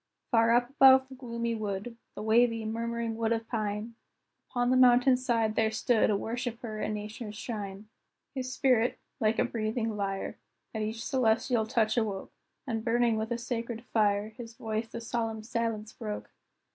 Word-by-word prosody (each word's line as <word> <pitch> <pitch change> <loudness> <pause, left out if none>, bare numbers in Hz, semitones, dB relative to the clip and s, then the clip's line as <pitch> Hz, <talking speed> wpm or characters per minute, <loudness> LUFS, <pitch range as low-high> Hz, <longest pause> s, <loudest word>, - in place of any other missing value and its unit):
Far 230 -1 +5
up 245 +1 +2
above 265 -1 +7
the - - -10
gloomy 235 -2 -3
wood, 215 +1 -4 0.2
The 210 - -5
wavy, 225 0 +3
murmuring 230 +1 -2
wood 225 0 0
of 225 -1 -1
pine, 215 0 -3 0.6
Upon 245 0 +1
the - - +4
mountain 255 +1 +6
side, 235 -4 +1
there 220 0 +2
stood 225 +1 +2
A 205 - +2
worshipper 230 0 -4
at - - -1
Nature's 210 +1 -5
shrine. 210 -3 -6 0.5
His 255 -1 -4
spirit, 250 -3 +2 0.2
like 220 0 +2
a - - +3
breathing 225 0 -2
lyre, 195 -1 -3 0.3
At 220 - -2
each 220 +2 -3
celestial 230 -2 +2
touch 225 -1 +1
awoke, 205 -4 -1 0.3
And 225 -4 -2
burning 235 0 +2
with 220 0 -2
a 240 - -1
sacred 235 -1 -4
fire, 210 -1 +2
His 225 +1 -10
voice 220 0 -3
the 230 - -7
solemn 225 -2 -2
silence 225 -2 -2
broke. 210 -3 -6
225 Hz, 165 wpm, -30 LUFS, 215-240 Hz, 0.6 s, above